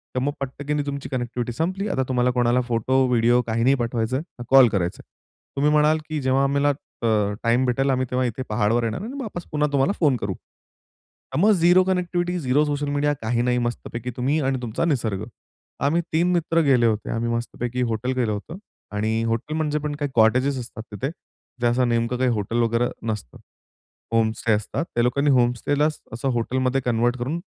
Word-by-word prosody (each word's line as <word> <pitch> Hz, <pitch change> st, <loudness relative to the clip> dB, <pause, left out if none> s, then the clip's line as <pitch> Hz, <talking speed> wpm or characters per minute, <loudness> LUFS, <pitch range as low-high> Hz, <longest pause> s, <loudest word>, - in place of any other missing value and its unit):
तर -, -, +2 dB
मग 140 Hz, +3 st, 0 dB
पटकनी 145 Hz, +2 st, -3 dB
तुमची 140 Hz, -1 st, -5 dB
कनेक्टिव्हिटी 120 Hz, -1 st, -3 dB
संपली. 185 Hz, -, -2 dB
आता 130 Hz, -9 st, 0 dB
तुम्हाला 125 Hz, -1 st, +2 dB
कोणाला 120 Hz, 0 st, +2 dB
फोटो, 130 Hz, +3 st, +2 dB
व्हिडिओ 120 Hz, 0 st, +3 dB
काही 115 Hz, +1 st, 0 dB
नाही 135 Hz, +2 st, +4 dB
पाठवायचंय, 120 Hz, 0 st, -1 dB
ना 145 Hz, -6 st, -10 dB
कॉल 135 Hz, -2 st, +8 dB
करायचाय. 90 Hz, -4 st, -2 dB, 0.5 s
तुम्ही 145 Hz, +2 st, +2 dB
म्हणाल 150 Hz, +1 st, +4 dB
की 155 Hz, -2 st, -2 dB
जेव्हा 130 Hz, +1 st, +2 dB
आम्हाला 140 Hz, +1 st, +2 dB, 0.3 s
अ, -, -, +2 dB, 0.4 s
टाईम 120 Hz, +2 st, +3 dB
भेटेल 135 Hz, +2 st, +1 dB
आम्ही 130 Hz, -1 st, +1 dB
तेव्हा 125 Hz, 0 st, 0 dB
इथे 120 Hz, +2 st, -3 dB
पहाडवर 105 Hz, +3 st, +1 dB
येणार 115 Hz, -, -2 dB
आणि 235 Hz, +6 st, -6 dB
वापस 185 Hz, -7 st, -6 dB
पुन्हा 150 Hz, 0 st, +1 dB
तुम्हाला 140 Hz, +7 st, +2 dB
फोन 145 Hz, -6 st, +3 dB
करू. 100 Hz, -3 st, -3 dB
तर 130 Hz, -, -15 dB
मग 210 Hz, +4 st, +5 dB
zero 180 Hz, 0 st, +5 dB
connectivity, 180 Hz, -1 st, -1 dB
zero 140 Hz, +1 st, +2 dB
social 145 Hz, 0 st, -2 dB
media 145 Hz, +1 st, +1 dB
काही 115 Hz, +2 st, 0 dB
नाही. 125 Hz, 0 st, +1 dB
मस्तपैकी 120 Hz, 0 st, -3 dB
तुम्ही 140 Hz, +5 st, +1 dB
आणि 135 Hz, -1 st, -1 dB
तुमचा 120 Hz, +7 st, -2 dB
निसर्ग. 110 Hz, -, -1 dB, 0.6 s
आम्ही 165 Hz, +5 st, +2 dB
3 175 Hz, +3 st, +3 dB
मित्र 165 Hz, -1 st, +2 dB
गेले 125 Hz, -3 st, +4 dB
होते. 110 Hz, -2 st, 0 dB
आम्ही 115 Hz, +1 st, -1 dB
मस्तपैकी 120 Hz, +1 st, -3 dB
हॉटेल 125 Hz, +4 st, -1 dB
गेलं 115 Hz, -4 st, +1 dB
होतं 110 Hz, -, -5 dB, 0.4 s
आणि 110 Hz, +2 st, 0 dB
हॉटेल 115 Hz, +7 st, -2 dB
म्हणजे 150 Hz, -1 st, 0 dB
पण 150 Hz, 0 st, -3 dB
काही 145 Hz, -2 st, -3 dB
कॉटेजेस 130 Hz, +5 st, +3 dB
असतात 115 Hz, -2 st, -8 dB
तिथे, 105 Hz, +7 st, -3 dB, 0.5 s
जे 120 Hz, -, +3 dB
असं 125 Hz, +1 st, +2 dB
नेमकं 115 Hz, +1 st, 0 dB
काही 130 Hz, 0 st, +2 dB
हॉटेल 115 Hz, +2 st, -1 dB
वगैरे 115 Hz, +1 st, +1 dB, 0.2 s
नसतं. 100 Hz, -, -7 dB, 0.8 s
होम 115 Hz, -1 st, +3 dB
स्टे 115 Hz, -, +1 dB
असतात. 105 Hz, +10 st, -2 dB
त्या 120 Hz, -, +3 dB
लोकांनी 140 Hz, +4 st, +2 dB
होम 120 Hz, 0 st, +3 dB
स्टेला 145 Hz, +5 st, +1 dB, 0.3 s
असं 125 Hz, +3 st, -2 dB
हॉटेलमध्ये 130 Hz, +3 st, 0 dB
कन्व्हर्ट 120 Hz, +1 st, +1 dB
करून 140 Hz, +8 st, -2 dB
130 Hz, 185 wpm, -23 LUFS, 115-145 Hz, 0.8 s, कॉल